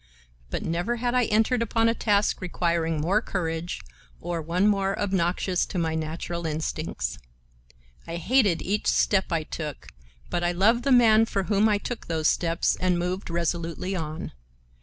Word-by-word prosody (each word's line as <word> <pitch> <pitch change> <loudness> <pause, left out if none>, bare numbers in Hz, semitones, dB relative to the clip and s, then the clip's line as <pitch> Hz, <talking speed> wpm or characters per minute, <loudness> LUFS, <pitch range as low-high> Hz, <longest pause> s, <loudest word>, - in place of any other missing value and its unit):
But - - -3
never 175 +8 -1
had 240 +1 -1
I 250 -1 +3
entered 220 +3 +2
upon 230 0 +2
a 230 - +3
task 210 -3 +1
requiring 170 -3 0
more 185 +8 +2
courage 170 -4 -3 0.4
or 170 -1 -3
one 175 +6 +1
more 195 -1 +1
obnoxious 185 -1 0
to - - -5
my 165 -2 0
natural 160 +2 -3
instincts. 155 - -3 0.9
I 165 - -4
hated 205 -1 +2
each 205 +3 -1
step 190 -2 +2
I 165 -2 0
took, 150 -2 -6 0.4
but 175 - -1
I 175 0 +1
loved 225 +7 +3
the 275 - +2
man 225 -3 +6
for 195 - -1
whom 205 +2 +3
I 210 - +3
took 235 +3 -6
those 160 -2 0
steps, 165 0 +1
and 180 -1 +1
moved 180 +2 -3
resolutely 170 +2 -2
on. 160 -2 -4
180 Hz, 160 wpm, -26 LUFS, 165-210 Hz, 0.9 s, man